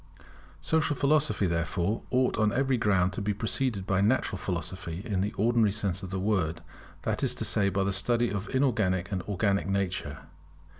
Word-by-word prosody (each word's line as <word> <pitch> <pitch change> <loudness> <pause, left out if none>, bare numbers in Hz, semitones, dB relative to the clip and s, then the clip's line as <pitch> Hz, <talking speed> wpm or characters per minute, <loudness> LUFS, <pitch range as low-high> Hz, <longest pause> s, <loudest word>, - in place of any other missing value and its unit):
Social 160 -2 +1
Philosophy, 140 -8 +2
therefore, 85 +4 -1
ought 130 -3 +1
on 105 -1 +3
every 135 +1 +1
ground 95 -5 +2
to - - -4
be 105 0 -1
preceded 115 -2 -1
by 95 0 +1
Natural 105 -3 +1
Philosophy 90 0 -4
in 100 -5 -1
the 100 +2 -1
ordinary 115 0 +2
sense 100 -2 -1
of 95 - -6
the 95 0 -3
word; 90 -5 0 0.4
that - - -1
is - - +1
to - - -1
say 100 -1 +3
by 95 0 0
the 100 0 0
study 120 +5 +1
of 100 0 -4
inorganic 105 -9 +1
and 95 -2 -1
organic 100 0 0
nature. 95 -7 -2
100 Hz, 180 wpm, -28 LUFS, 95-115 Hz, 0.4 s, on